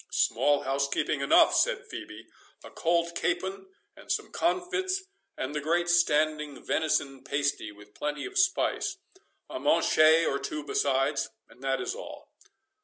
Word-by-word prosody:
"Small 145 -1 +2
housekeeping 140 +1 -1
enough," 140 - +5
said - - +2
Phœbe; 105 +1 -9 0.4
"a - - -11
cold 170 0 0
capon 190 - -2 0.3
and - - -8
some - - -2
comfits, 370 +2 -1 0.3
and 130 +2 -3
the 150 - -2
great 170 +4 +1
standing 155 -4 +2
venison 140 -4 0
pasty, 140 -6 -1
with 105 0 -17
plenty 150 0 -4
of 395 - -8
spice—a 380 0 -2
manchet 160 +1 +4
or 140 - 0
two 150 +2 -5
besides, 135 -6 0 0.2
and 125 - -18
that 135 0 0
is - - -3
all." - - -10
150 Hz, 135 wpm, -28 LUFS, 140-175 Hz, 0.4 s, enough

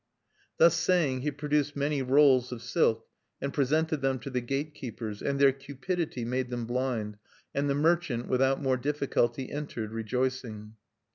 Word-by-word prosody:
Thus 165 0 +6
saying, 165 -7 +2
he 150 - 0
produced 145 0 -1
many 145 0 0
rolls 130 -1 +4
of 120 -1 -6
silk, 115 -2 +1 0.3
and 140 - -3
presented 155 +2 +1
them 135 -1 +1
to 140 - -6
the 125 -1 -1
gate 140 +5 -3
keepers; 110 -6 -6
and 140 0 -1
their 140 -1 +6
cupidity 140 0 -4
made 125 +1 -1
them 120 -2 -3
blind; 120 -4 -2 0.4
and 140 +1 0
the 140 - +1
merchant, 150 -6 +1
without 135 +1 +2
more 130 -2 +1
difficulty, 135 -2 -1
entered, 130 -7 -4
rejoicing. 115 -1 -3
135 Hz, 155 wpm, -29 LUFS, 120-145 Hz, 0.4 s, Thus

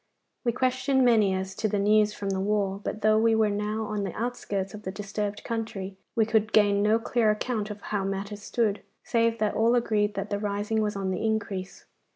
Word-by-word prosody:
We 240 - +2
questioned 255 +2 +1
many 220 -5 +4
as 190 0 -3
to 215 - -1
the 205 - -1
news 210 +1 +4
from 200 -1 -4
the 190 - -1
war, 200 0 0
but 215 - -4
though 215 0 +5
we 225 0 +4
were 220 -1 +3
now 210 +2 -2
on 210 -1 -3
the 195 - -5
outskirts 205 -5 -3
of 210 - -8
the 190 - -4
disturbed 205 +1 -4
country, 215 -4 -4 0.2
we 225 - +3
could 220 -1 +1
gain 205 -1 +4
no 215 +2 +4
clear 230 -1 +1
account 215 0 -1
of 210 -1 -7
how 205 -2 -2
matters 200 +1 -4
stood, 215 -2 0 0.2
save 230 -2 +1
that 215 -2 0
all 230 +2 +3
agreed 210 -3 +1
that 200 +1 -4
the 205 - 0
rising 210 +1 -1
was 210 -1 -1
on 195 -1 -2
the 185 - -2
increase. 205 -4 -3
210 Hz, 210 wpm, -27 LUFS, 200-220 Hz, 0.2 s, though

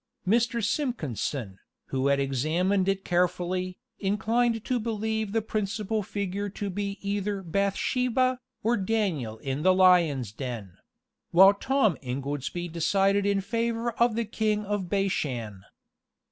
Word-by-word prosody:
Mr. 235 +2 +2
Simpkinson, 145 - -2 0.3
who 135 0 0
had 140 0 +3
examined 165 +9 +1
it 195 0 -1
carefully, 180 +1 0 0.2
inclined 225 +3 +1
to 250 -1 0
believe 220 -1 -2
the 225 0 0
principal 215 0 -2
figure 200 0 -3
to 200 0 -4
be 200 +1 -3
either 200 0 -1
Bathsheba, 250 +8 +1 0.2
or 230 +1 +2
Daniel 190 - -1
in 135 +4 -3
the 185 +3 +4
lions' 170 - +4
den; 115 -6 -6 0.5
while 190 +3 +8
Tom 260 - +1
Ingoldsby 140 +6 -3
decided 195 +4 +2
in 200 -1 +2
favor 230 +3 -1
of 235 0 +2
the 230 0 0
king 215 0 -1
of 200 -3 -2
Bashan. 130 - -1
195 Hz, 125 wpm, -27 LUFS, 160-220 Hz, 0.5 s, while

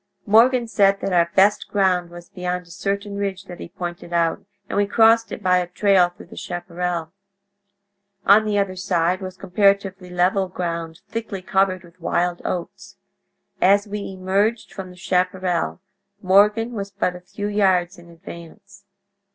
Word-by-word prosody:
Morgan 235 +3 +4
said 200 -3 +3
that 195 - -2
our 170 -1 +3
best 200 +2 +4
ground 185 -3 +1
was 175 0 -12
beyond 180 0 -3
a 170 - -16
certain 200 +3 -3
ridge 195 -1 -3
that 180 -2 -11
he - - -8
pointed 175 -1 -7
out, 170 -1 0 0.2
and - - -5
we 205 0 +2
crossed 225 +1 +4
it - - -7
by 180 -1 +4
a 180 -1 -1
trail 185 0 +3
through 175 - -15
the - - -14
chaparral. 175 -1 -4 1.1
On 205 +2 +6
the 210 -1 -1
other 195 -2 0
side 180 0 0
was 185 -1 -7
comparatively 195 -1 +1
level 180 +2 +1
ground, 170 -2 -5
thickly 220 -4 -5
covered 190 -1 +1
with 175 +1 -19
wild 175 +1 0
oats. 175 -2 -5 0.6
As 200 +3 +4
we 210 +1 -4
emerged 195 +5 -1
from 190 -1 -7
the 180 - -13
chaparral, 180 -1 -1 0.4
Morgan 210 +4 +3
was 200 -4 -5
but 195 -2 -2
a 180 - -10
few 205 +3 -7
yards 190 -3 +1
in 170 0 -16
advance. 170 0 -13
185 Hz, 160 wpm, -22 LUFS, 175-200 Hz, 1.1 s, On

